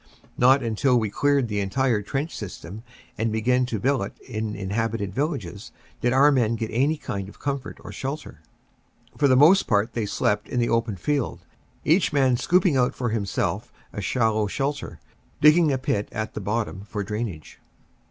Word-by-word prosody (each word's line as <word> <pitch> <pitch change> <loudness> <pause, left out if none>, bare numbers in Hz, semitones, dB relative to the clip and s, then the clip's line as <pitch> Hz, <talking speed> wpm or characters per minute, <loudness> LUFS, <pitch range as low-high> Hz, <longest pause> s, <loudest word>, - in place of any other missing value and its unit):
Not 130 +2 +5
until 120 +3 +2
we 110 -3 -2
cleared 140 +2 +2
the 105 -2 -2
entire 110 +3 +1
trench 140 +9 -3
system, 100 0 -8 0.4
and 110 0 0
began 125 +3 +1
to 115 -4 -3
billet 125 -3 -1
in 110 -1 -4
inhabited 100 +1 -2
villages, 115 - -3 0.3
did 120 - +2
our 140 +3 +5
men 115 -4 +2
get 110 -1 -4
any 140 +7 +2
kind 100 -7 -5
of - - -15
comfort 140 -1 -4
or - - -8
shelter. 135 - -6 0.8
For 145 - +4
the 130 - +5
most 160 +9 +6
part 110 0 +1
they 115 -3 -2
slept 105 +1 0
in 125 - -1
the 120 - +1
open 115 -2 0
field, 140 - -2 0.4
each 170 +5 +3
man 135 -4 +3
scooping 175 +4 +2
out 125 -1 +2
for 125 -2 -2
himself 105 -1 -2 0.2
a 105 - -4
shallow 110 0 +1
shelter, 140 +7 -3 0.4
digging 150 +1 +6
a 135 - +1
pit 105 -5 -1
at 110 0 -4
the - - -5
bottom 105 -1 -2
for 105 -1 -4
drain 105 +3 -2
age. 80 -4 -12
115 Hz, 175 wpm, -24 LUFS, 105-135 Hz, 0.8 s, most